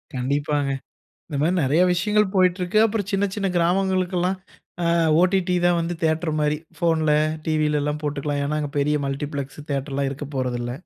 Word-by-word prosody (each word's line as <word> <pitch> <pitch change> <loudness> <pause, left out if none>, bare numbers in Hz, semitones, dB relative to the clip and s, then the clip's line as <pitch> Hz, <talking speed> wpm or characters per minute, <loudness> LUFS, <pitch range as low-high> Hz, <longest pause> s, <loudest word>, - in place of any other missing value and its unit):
கண்டிப்பாங்க. 140 +2 0 0.6
இந்தமாரி 155 +3 0
நறைய 150 +7 +3
விஷயங்கள் 210 +2 +1
போயிட்ருக்கு. 180 +1 +2
அப்பறம் 205 -2 -2
சின்ன, 200 +1 +2
சின்ன 200 -2 -1
கிராமங்களுக்குலாம், 185 +1 +1 0.5
அ - - 0 0.4
ஓடிடி 185 -1 +2
தான் 175 -1 +3
வந்து 170 +1 -2
தியேட்டர்மாரி 155 -2 +1 0.2
ஃபோன்ல, 160 -3 +2 0.3
டிவிலலாம் 150 -1 0
போட்டுக்கலாம். 145 0 -2
ஏன்னா, 150 +1 -1
அங்க 145 -1 -4
பெரிய 150 +1 +2
மல்டிப்ளக்ஸ் 140 0 -4
தியேட்டர்லாம் 140 0 -1
இருக்கப் 145 +1 -7
போறது 125 -2 -1
இல்ல. 120 0 -3
155 Hz, 140 wpm, -23 LUFS, 145-180 Hz, 0.6 s, நறைய